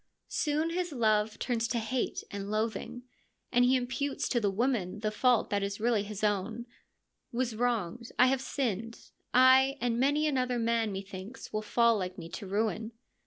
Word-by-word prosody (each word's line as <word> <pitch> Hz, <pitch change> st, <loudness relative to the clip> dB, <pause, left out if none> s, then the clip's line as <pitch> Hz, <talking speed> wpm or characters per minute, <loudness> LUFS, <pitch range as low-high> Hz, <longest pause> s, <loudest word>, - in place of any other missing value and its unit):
Soon 310 Hz, +2 st, 0 dB
his 355 Hz, 0 st, -2 dB
love 215 Hz, -4 st, +1 dB
turns 230 Hz, -2 st, -1 dB
to 240 Hz, -, -1 dB
hate 235 Hz, +3 st, -2 dB
and 200 Hz, 0 st, -5 dB
loathing, 225 Hz, +3 st, -2 dB, 0.5 s
and 245 Hz, 0 st, +4 dB
he 250 Hz, +1 st, +4 dB
imputes 260 Hz, +3 st, -1 dB
to 240 Hz, -, +2 dB
the 205 Hz, -3 st, +1 dB
woman 210 Hz, -3 st, -1 dB
the 215 Hz, -1 st, 0 dB
fault 245 Hz, +2 st, +2 dB
that 205 Hz, 0 st, +1 dB
is 200 Hz, +1 st, -3 dB
really 225 Hz, -1 st, +2 dB
his 210 Hz, 0 st, -6 dB
own: 210 Hz, +3 st, 0 dB, 0.2 s
' -, -, -49 dB
/ -, -, -52 dB
was 240 Hz, -2 st, -1 dB
wronged, 235 Hz, -1 st, -1 dB
I 250 Hz, -, +7 dB
have 260 Hz, 0 st, +2 dB
sinned. 230 Hz, -5 st, -3 dB, 0.2 s
Aye! 260 Hz, +2 st, +6 dB
and 240 Hz, -1 st, 0 dB
many 290 Hz, +4 st, +2 dB
another 255 Hz, -4 st, +1 dB
man, 230 Hz, -2 st, +1 dB
methinks, 195 Hz, +4 st, -8 dB
will 215 Hz, -, 0 dB
fall 230 Hz, +1 st, +3 dB
like 185 Hz, -1 st, -4 dB
me 165 Hz, -, -8 dB
to 200 Hz, +3 st, -7 dB
ruin.' 220 Hz, +3 st, -1 dB
230 Hz, 180 wpm, -30 LUFS, 210-255 Hz, 0.5 s, I